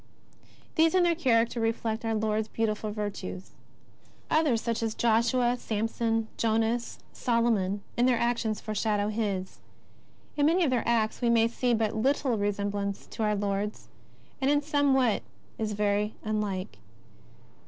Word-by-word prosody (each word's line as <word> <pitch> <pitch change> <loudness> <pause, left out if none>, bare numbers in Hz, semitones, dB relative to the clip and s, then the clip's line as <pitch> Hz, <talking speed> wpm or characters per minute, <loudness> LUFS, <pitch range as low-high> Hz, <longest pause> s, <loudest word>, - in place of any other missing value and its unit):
These 325 +2 +4
in 365 - +5
their 345 -1 +4
character 235 -7 +2
reflect 225 0 -1
our 225 -1 0
Lord's 215 0 0
beautiful 215 -1 -2
virtues. 205 -3 -5 0.8
Others, 295 -8 +3
such 230 -1 -2
as 225 -1 -2
Josue, 240 +2 +2
Samson, 225 +1 -1
Jonas, 225 +1 0 0.2
Solomon, 225 -5 +1
in 245 +1 +3
their 250 -2 +3
actions 235 -3 0
foreshadow 210 -1 -1
His. 200 -4 -3 0.8
In 290 0 +3
many 350 +3 +3
of 290 - +2
their 245 -2 +2
acts 225 -1 +1
we 240 - +2
may 230 -1 +4
see 240 +1 0
but 220 -1 0
little 260 +2 +1
resemblance 205 -1 -2
to - - -6
our 210 -1 +2
Lord's, 205 +1 -3 0.5
and 265 - +2
in 290 0 +3
some 285 -2 +2
what 250 -5 +2 0.4
is 215 -1 -1
very 210 +1 0
unlike. 200 - -3
225 Hz, 145 wpm, -28 LUFS, 210-240 Hz, 0.8 s, in